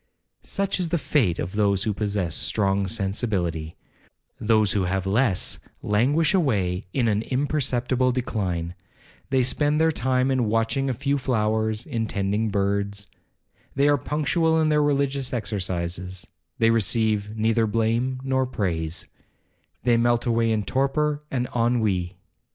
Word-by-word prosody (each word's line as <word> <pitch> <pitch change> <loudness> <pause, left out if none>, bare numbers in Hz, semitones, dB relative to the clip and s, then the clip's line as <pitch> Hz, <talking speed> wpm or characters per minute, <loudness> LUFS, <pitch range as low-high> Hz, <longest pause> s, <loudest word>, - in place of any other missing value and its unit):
'Such 195 -1 -2
is 175 -2 -1
the 170 - +1
fate 120 - +1
of 85 - -3
those 100 -2 +1
who 110 - 0
possess 100 -5 -1
strong 100 0 +1
sensibility; 95 -6 -2 0.6
those 110 -2 +3
who 100 -3 +1
have 95 +1 -1
less 105 0 +1 0.2
languish 140 - +2
away 100 - +1
in 120 +1 +1
an 105 -1 +1
imperceptible 130 -1 0
decline. 95 -9 -2 0.6
They 130 -2 +3
spend 145 +4 +1
their 160 0 +4
time 130 -1 +1
in 130 -3 +1
watching 115 +5 0
a 130 - -1
few 140 +4 0
flowers, 110 -2 0
in 115 -6 -2
tending 100 +3 -1
birds. 100 0 -1 0.7
They 140 +1 +3
are 145 - +5
punctual 160 +4 +1
in 155 -1 +2
their 150 0 +3
religious 140 -2 0
exercises, 90 -4 -3 0.3
they 115 0 +4
receive 110 -1 +1
neither 110 +1 +2
blame 115 +4 0
or 130 -1 +1
praise,—they 90 +4 -4
melt 120 0 +2
away 115 -1 +2
in 110 -2 0
torpor 145 +6 0
and 125 -2 -1
ennui. 110 -7 0
115 Hz, 135 wpm, -24 LUFS, 100-130 Hz, 0.7 s, are